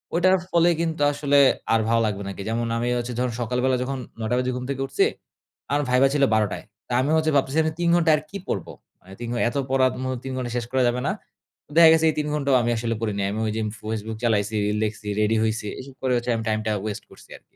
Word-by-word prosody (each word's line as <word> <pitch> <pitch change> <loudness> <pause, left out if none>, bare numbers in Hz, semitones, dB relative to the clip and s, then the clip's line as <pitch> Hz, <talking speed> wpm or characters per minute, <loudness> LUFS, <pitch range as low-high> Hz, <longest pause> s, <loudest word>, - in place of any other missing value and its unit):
ঐটার 185 +2 +4
ফলে 170 -1 +4
কিন্তু 165 -2 -2
আসলে 145 0 +2 0.3
আর 115 - +4
ভালো 115 0 +3
লাগবে 100 -2 -2
না - - -4
আরকি। 100 - -7
যেমন 115 +1 -1
আমি 120 +1 -1
হচ্ছে 120 0 -3
যখন 125 -1 0
সকালবেলা 125 +2 +1
যখন 135 +1 -3 0.2
৯ঃ০০ 110 +2 -1
বাজে 125 0 -1
ঘুম 125 - -4
থেকে 135 -1 -2
উঠছি, - - +2 0.7
আমার 145 +1 +2
ভাইভা 125 +2 +5
ছিল 145 -1 +2
১২ঃ০০ 105 -2 +1
য়। - - -22 0.2
তো - - -12
আমি 140 +4 0
হচ্ছে 155 0 +1
ভাবতেছি 140 +3 +1 0.2
৩ 170 -1 +1
ঘন্টা 165 -2 +3
আর - - -5
কি 200 - -6
পড়ব? 95 - -3 0.3
মানে 95 +1 -14
৩ 120 - -4
ঘ - - -3
এত 120 - -5
পড়ার 130 -1 +3
ম - - -3 0.2
৩ 135 - -5
ঘন্টায় 125 -2 -4
শেষ 120 - -2
করা 130 0 +2
যাবে 125 +1 -2
না। - - +2 0.6
দেখা 165 -1 +9
গেছে 160 0 +3
এই - - -10
৩ 150 - -1
ঘন্টাও 140 -3 +1
আমি 120 - 0
আসলে 115 0 -2
পড়ি 110 -2 -1
নাই। 100 - 0
আমি 105 - -3
ঐদিন 110 0 -2
ফেসবুক 110 0 -4
চালাইছি, 110 -1 +1 0.2
লেখছি, 105 -1 -3
রেডি 110 +1 +2
হইছি। 110 -1 -1
এসব 135 +1 -10
করে 130 -1 +1
হচ্ছে 120 +1 -4
আমি 115 - -3
টাইম 110 - +1
টা - - +1
waste 105 -1 -5
করছি - - -17
আরকি। - - -26
125 Hz, 245 wpm, -24 LUFS, 110-140 Hz, 0.7 s, দেখা